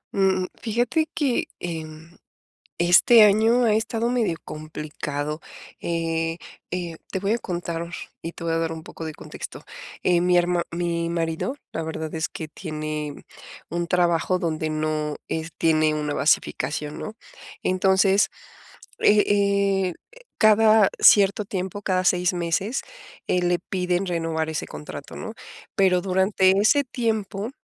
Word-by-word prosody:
Mm, 190 -1 +2 0.2
fíjate 240 +8 0
que 275 -6 +1
en 160 -1 -7 0.6
este 175 +7 +7
año 220 +4 +5
ha 220 -2 +3
estado 225 +1 0
medio 235 -9 0
complicado. 150 -1 -5 0.4
Eh 165 -1 -1 0.3
eh, 175 -2 -4
te 190 - -2
voy 195 +2 0
a 235 - +1
contar 170 -4 -4 0.4
y 165 - -5
te - - -11
voy 165 -1 0
a - - +1
dar 165 0 -1
un 160 -1 -7
poco 165 - -9
de 160 - -4
contexto. - - -9 0.4
Eh, 175 -1 +3
mi 180 0 +4
herma 175 0 +2
mi 170 -1 -1
marido, 165 +8 -2 0.2
la 165 - -3
verdad 160 -1 -5
es 160 0 -2
que 160 - -6
tiene 155 -2 -5 0.5
un 170 +1 -2
trabajo 175 +1 +2
donde 160 -2 -2
no 155 -1 -1
es 160 0 -3
tiene 155 -1 +3
una 150 -1 -2
basificación, 150 0 0
¿no?, 215 - -5 0.5
entonces, 190 +2 +3 0.7
eh 205 0 +5
eh, 200 -2 +2 0.2
e - - -16 0.2
cada 215 -1 +6
cierto 200 +1 +6
tiempo, 190 0 -4
cada 185 -2 0
6 180 +1 +3
meses, 180 +8 -1 0.5
eh, 180 - +2
le 175 0 +2
piden 180 0 -1
renovar 165 -2 -1
ese 155 - -3
contrato, 75 0 -9
¿no?, - - -6 0.4
pero 185 -2 +4
durante 190 0 +3
ese 280 +8 +4
tiempo, 220 -4 -2
175 Hz, 140 wpm, -24 LUFS, 160-200 Hz, 0.7 s, este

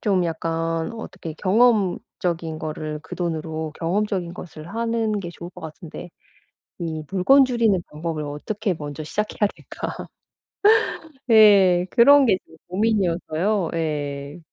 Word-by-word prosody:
좀 190 -4 +2
약간 165 +1 -2
어떻게 195 -7 -7
경험적인 185 -6 +1
거를 155 -1 -4
그 180 - -8
돈으로 160 -2 -3
경험적인 185 0 -1
것을 155 -2 -10
하는 225 0 -1
게 175 -3 -5
좋을 175 0 -9
것 - - -13
같은데 165 +2 -9 0.7
이 160 -2 -4
물건 260 +9 +5
줄이는 230 -7 +2
방법을 155 0 -4
어떻게 190 +8 -3
먼저 150 0 -6
시작해야 210 +4 0
될까?' - - -7 1.4
예. 195 -5 +6
그런 275 +3 +7
게 200 - +4
지금 160 - -19
고민이어서요. 185 -2 0
예. 145 -1 -3
175 Hz, 265 characters per minute, -23 LUFS, 160-210 Hz, 1.4 s, 그런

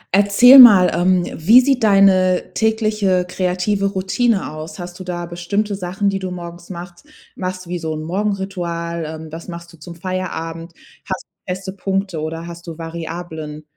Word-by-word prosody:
Erzähl 205 +7 +7
mal, 205 -8 +9
ähm, 180 +1 +2
wie 215 +11 +6
sieht 255 -2 +1
deine 195 -3 +4
tägliche 215 -4 +1
kreative 185 +2 -1
Routine 195 +1 0
aus? 155 +1 -8
Hast 175 0 -9
du - - -7
da 175 -1 -5
bestimmte 190 +5 -3
Sachen, 190 +1 -2
die 195 - -2
du 190 -1 -4
morgens 175 -1 -9
machst 175 +6 -10 0.3
machst 185 0 -5
du 175 - -11
wie 175 - -2
so 160 -1 -4
'n 155 - -6
Morgenritual? 175 -3 -3
Ähm, 160 0 -8
was 165 +1 -9
machst 170 -1 -9
du - - -16
zum 170 +2 -10
Feierabend? 170 -2 -5 0.4
Hast 190 - -3
du - - -69 0.2
feste 190 +1 -5
Punkte 195 -3 -3
oder 165 +2 -5
hast 170 0 -10
du 165 -2 -7
Variablen? 165 -2 -7
180 Hz, 170 wpm, -19 LUFS, 170-195 Hz, 0.4 s, mal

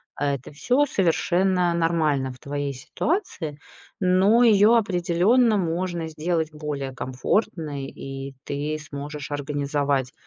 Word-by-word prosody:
А 140 -1 0
это 130 - -10
всё 250 - +2
совершенно 180 - +2
нормально 155 -6 +1
в - - -15
твоей 145 0 -3
ситуации, 155 - -3 0.4
но 195 +6 +4
её 215 0 +6
определённо 205 +3 +3
можно 170 -1 -2
сделать 160 0 -1
более 145 -3 -4
комфортной. 140 - -2
И 135 0 -7
ты 145 +2 -3
сможешь 145 0 -7
организовать 145 -2 -1
155 Hz, 110 wpm, -24 LUFS, 140-185 Hz, 0.4 s, её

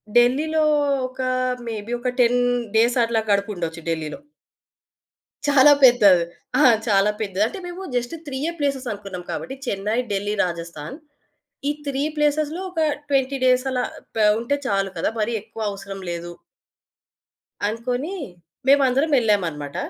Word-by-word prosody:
ఢిల్లీలో 285 +7 +3 0.5
ఒకా 255 0 -3 0.4
మేబీ 220 0 -5
ఒక 250 - -1
10 245 0 +4 0.4
డేసట్లా 235 -1 +3
గడుపుండొచ్చు 175 -5 -1
ఢిల్లీలో. 160 - -3 1.3
చాలా 290 0 +7
పెద్దది. 205 -9 +7 0.4
ఆ! - - +6 0.2
చాలా 200 -1 +4
పెద్దది. 195 -1 0
అంటే, 380 - -7
మేము 355 +2 -7
జస్ట్ 245 +6 -1
త్రీయే 285 +3 -3
ప్లేసేసనుకున్నాం 220 -10 -3
కాబట్టి, 265 - -5
చెన్నై, 210 0 -1
ఢిల్లీ, 205 +1 -1
రాజస్థాన్. 170 - -6 0.7
ఈ - - +3 0.2
3 275 0 -1
ప్లేసేస్‌లో 300 +3 +1
ఒక 330 -3 -1 0.3
20 275 -1 +1
డేసలా 255 0 +2 0.3
ప - - -5 0.2
ఉంటే 235 +5 -1
చాలు 195 -2 0
కదా! 165 - 0
మరీ 215 +2 0
ఎక్కువ 220 +1 -10
అవసరం 200 -1 -8
లేదు. 170 0 -5 1.4
అనుకోనీ 250 - -3 0.5
మేమందరమెళ్ళామనమాట. 245 - +2
235 Hz, 115 wpm, -22 LUFS, 200-270 Hz, 1.4 s, చాలా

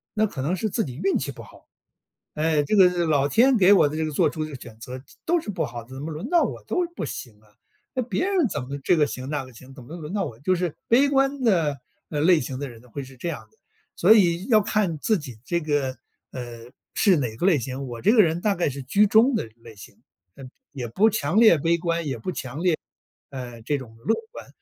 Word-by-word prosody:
那 215 0 +3
可 135 -8 -6
能 165 +7 0
是 215 - -2
自 225 - 0
己 125 -3 -7
运 195 - +2
气 140 0 -4
不 - - -11
好： - - -17 0.7
“唉， 155 -1 +2
这 180 - 0
个 180 -3 +5
老 145 -3 +2
天 250 - +4
给 195 0 +6
我 170 - +5
的 155 - -6
这 160 - 0
个 155 - -3
做 145 - +3
出 155 - -4
的 150 -3 -8
选 120 -3 -11
择 125 +2 -8 0.2
都 345 +1 +2
是 215 - -8
不 185 -4 -2
好 120 -1 -7
的， 115 - -22
怎 135 - -7
么 160 +3 -5
轮 155 +2 -5
到 345 -1 +4
我 - - -4
都 360 - 0
不 - - -3
行 110 -5 -8
啊， 105 - -25 0.5
那 255 - +1
别 255 +9 -1
人 380 -7 +2
怎 145 - -3
么 135 +2 -6
这 175 - +3
个 150 - +4
行 130 -1 -6
那 145 -3 -2
个 130 - -15
行， 130 +3 -14
怎 130 - -12
么 155 +8 -9
轮 155 -1 -7
到 205 - 0
我” 115 - -9
就 185 +4 +2
是 175 -3 -2
悲 270 +5 +4
观 275 0 +1
的， 165 - +2 0.3
呃， 150 - -2
类 170 +1 +5
型 130 +1 -5
的 140 -2 -4
人 115 -1 -13
呢， 125 - -20
会 140 +4 -6
是 130 -1 -14
这 170 - -4
样 - - -7
的。 440 - -33 0.4
所 220 - +6
以 175 -3 +3
要 220 -4 +5
看 200 -5 0
自 215 +4 +1
己 130 -7 -9
这 170 0 0
个， 145 -4 -1 0.4
呃， 120 -1 -8 0.2
是 195 -5 +4
哪 120 -6 -2
个 180 - -1
类 170 -8 +4
型。 130 +3 -5
我 120 -1 -7
这 210 - +4
个 225 - +7
人 165 0 0
大 205 -2 +1
概 170 - 0
是 140 0 -7
居 200 +11 +3
中 230 +6 +4
的 215 - -2
类 115 -1 -14
型， 100 - -13 0.4
那， 135 - -11 0.3
也 125 -4 -5
不 205 - +3
强 190 -1 0
烈 220 -7 +7
悲 165 +3 +1
观， 170 -1 -2
也 135 -3 -3
不 115 +11 -4
强 140 +5 -6
烈 175 -3 +3 0.6
呃， 125 -3 -7
这 145 +4 0
种 115 -4 -11
乐 225 - +1 0.2
观。 - - -10
155 Hz, 275 characters per minute, -24 LUFS, 130-200 Hz, 0.7 s, 个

